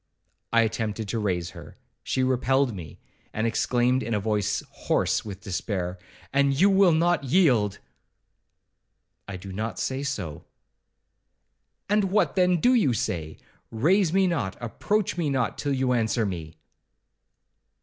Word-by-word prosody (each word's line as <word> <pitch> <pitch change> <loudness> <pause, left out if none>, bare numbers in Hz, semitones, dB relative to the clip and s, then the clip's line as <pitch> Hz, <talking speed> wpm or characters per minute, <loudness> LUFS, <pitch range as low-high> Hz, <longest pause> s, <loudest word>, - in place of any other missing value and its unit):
I 115 - +5
attempted 110 -1 -2
to 115 - -1
raise 90 -4 -1
her; 85 -4 -12 0.2
she 130 - -1
repelled 130 0 +2
me, 85 -6 -9 0.4
and 110 - -1
exclaimed, 125 +2 +1
in 115 -3 -2
a - - +1
voice 105 -1 -1
hoarse - - 0
with 100 -3 -8
despair, 95 -2 -3 0.3
'And 140 -1 +2
you 200 +3 +5
will 195 -2 +5
not 165 -2 +2
yield?' 125 - +3 1.5
'I 95 -2 -5
do 95 +1 -9
not 110 0 -4
say 135 +1 -2
so.' 110 - -4 1.4
'And 210 0 +2
what, 195 +3 +1
then, 180 -2 +3
do 245 +9 +4
you 205 - +3
say?—raise 115 - -1
me 190 +1 +3
not, 105 - -1
approach 180 - -1
me 165 -4 0
not, 130 -4 -1
till 145 -1 -1
you 130 -1 +1
answer 115 -1 +1
me.' 80 -5 -5
120 Hz, 140 wpm, -26 LUFS, 100-155 Hz, 1.5 s, I